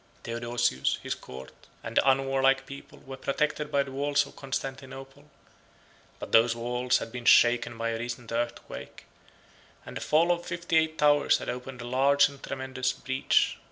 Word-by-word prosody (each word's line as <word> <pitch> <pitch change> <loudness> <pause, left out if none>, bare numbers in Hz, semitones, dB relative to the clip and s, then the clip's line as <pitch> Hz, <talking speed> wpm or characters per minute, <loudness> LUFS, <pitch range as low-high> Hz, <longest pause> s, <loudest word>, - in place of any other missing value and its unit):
20 - - -6
Theodosius, 120 - 0
his - - -2
court, 65 +1 -10 0.3
and - - -7
the - - +6
unwarlike 135 0 +2
people, 140 +1 -11
were 135 0 -7
protected 150 +3 -2
by 140 0 +2
the 135 - -10
walls 145 +1 +1
of - - -15
Constantinople; 135 0 -6 0.9
but - - -8
those 115 +1 +5
walls 125 +1 0
had 115 - -6
been 125 0 -7
shaken 120 0 +4
by 115 0 -2
a 115 0 -3
recent 120 0 -6
earthquake, 120 +1 -5 0.8
and - - -9
the - - -5
fall 165 +3 +3
of 175 0 -1
fifty 170 -1 -3
eight 160 0 +1
towers 145 -1 +4
had - - -6
opened 125 0 -6
a 120 - -7
large 140 +3 +4
and 140 -1 -14
tremendous 130 -1 -3
breach. 130 -1 +1
135 Hz, 170 wpm, -28 LUFS, 120-140 Hz, 0.9 s, the